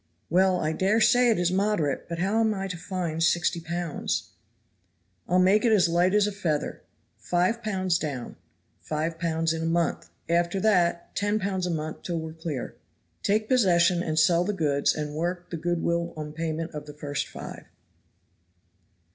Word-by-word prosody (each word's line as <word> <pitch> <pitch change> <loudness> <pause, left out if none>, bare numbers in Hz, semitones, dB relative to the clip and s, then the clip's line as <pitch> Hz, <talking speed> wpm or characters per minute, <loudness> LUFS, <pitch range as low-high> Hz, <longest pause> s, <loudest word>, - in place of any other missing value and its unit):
"Well, 185 +1 +4
I 155 -1 0
dare 195 +6 +2
say 245 +2 +5
it 225 - +3
is 175 0 +1
moderate, 190 -8 0
but 170 - -3
how 195 +6 +1
am 220 -1 +2
I 195 0 -3
to 180 - -4
find 175 -2 -3
sixty 170 +1 +2
pounds?" 170 -1 -3 1.0
"I'll 180 - +3
make 190 +3 +4
it 235 - +3
as 190 -5 +5
light 175 +3 +2
as 210 -1 +4
a 210 - -1
feather. 165 -7 -2 0.4
Five 180 +7 0
pounds 185 -5 0
down. 135 -6 -5 0.4
Five 160 +2 -3
pounds 165 -1 0
in 160 - -3
a - - -2
month; 165 - 0 0.2
after 170 +2 +1
that 175 -5 +1
ten 205 +1 +1
pounds 190 -3 -1
a - - -2
month 155 -2 -4
till 170 -2 -3
we 160 0 -6
are - - -11
clear. 160 -5 -5 0.5
Take 215 +2 +1
possession 180 -8 +4
and 155 -3 -2
sell 170 +2 +4
the 210 +3 -1
goods 145 -6 +1
and 150 -1 -4
work 175 +3 -3
the 170 - -3
good 170 +1 -1
will 170 0 -1
on 150 -1 -6
payment 160 +1 -3
of 150 -1 -7
the 150 - -8
first 145 -1 -3
five." - - -9
170 Hz, 180 wpm, -26 LUFS, 160-190 Hz, 1.0 s, say